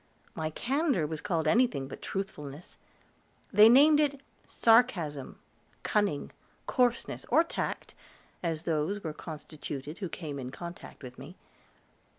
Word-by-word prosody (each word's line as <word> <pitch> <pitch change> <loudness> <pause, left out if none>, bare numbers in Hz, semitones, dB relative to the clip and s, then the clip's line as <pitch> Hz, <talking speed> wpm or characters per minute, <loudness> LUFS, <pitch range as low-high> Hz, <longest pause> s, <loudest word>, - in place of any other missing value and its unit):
My 155 -1 -2
candor 270 - 0
was 155 0 -4
called 165 -4 -1
anything 155 - +2
but - - -9
truthfulness; 155 -6 -6 0.7
they 215 +1 +9
named 295 +5 +7
it 285 -2 +1 0.3
sarcasm, 190 - +2 0.5
cunning, 205 -9 0 0.3
coarseness, 245 -1 0
or 325 - +5
tact, 335 - -4 0.5
as 165 -2 -2
those 170 +5 -1
were 160 -2 -3
constituted 150 -1 -7
who 190 -4 -3
came 150 -4 -6
in 125 -1 -5
contact 170 +2 -9
with 125 -1 -9
me. - - -10
170 Hz, 125 wpm, -30 LUFS, 150-235 Hz, 0.7 s, they